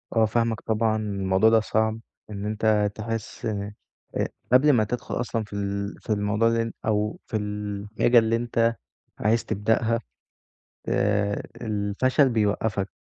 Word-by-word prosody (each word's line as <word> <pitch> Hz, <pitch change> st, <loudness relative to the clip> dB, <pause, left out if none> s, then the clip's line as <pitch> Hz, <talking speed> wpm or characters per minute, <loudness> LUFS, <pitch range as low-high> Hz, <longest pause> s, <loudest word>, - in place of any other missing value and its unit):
آه 115 Hz, -1 st, +5 dB
فاهمَك، 115 Hz, 0 st, 0 dB
طبعًا 110 Hz, 0 st, +1 dB
الموضوع 100 Hz, 0 st, +2 dB
ده 115 Hz, 0 st, +5 dB
صعب، 110 Hz, +1 st, 0 dB, 0.3 s
إن 100 Hz, -1 st, -5 dB
أنت 105 Hz, -1 st, +1 dB
تحس 115 Hz, +1 st, -4 dB, 0.7 s
ق -, -, +1 dB, 0.3 s
قبل 140 Hz, +4 st, +6 dB
ما 115 Hz, -4 st, +4 dB
تدخل 120 Hz, +3 st, -3 dB
أصلًا 115 Hz, -2 st, -2 dB
في 105 Hz, -, -13 dB
ال 100 Hz, 0 st, -3 dB
في -, -, -18 dB
الموضوع 105 Hz, +2 st, +1 dB
اللي 115 Hz, 0 st, +1 dB
أو 105 Hz, 0 st, 0 dB
في 110 Hz, -, -1 dB
الحاجة 105 Hz, +3 st, +1 dB
اللي 115 Hz, 0 st, +1 dB
أنت 115 Hz, 0 st, +1 dB, 0.4 s
عايز 110 Hz, +2 st, +2 dB
تبدأها، 110 Hz, +3 st, +1 dB, 0.9 s
آآ، 100 Hz, 0 st, +1 dB, 0.2 s
الفشل 110 Hz, +6 st, +1 dB
بيوقفك، 105 Hz, -3 st, 0 dB
110 Hz, 135 wpm, -25 LUFS, 105-115 Hz, 0.9 s, قبل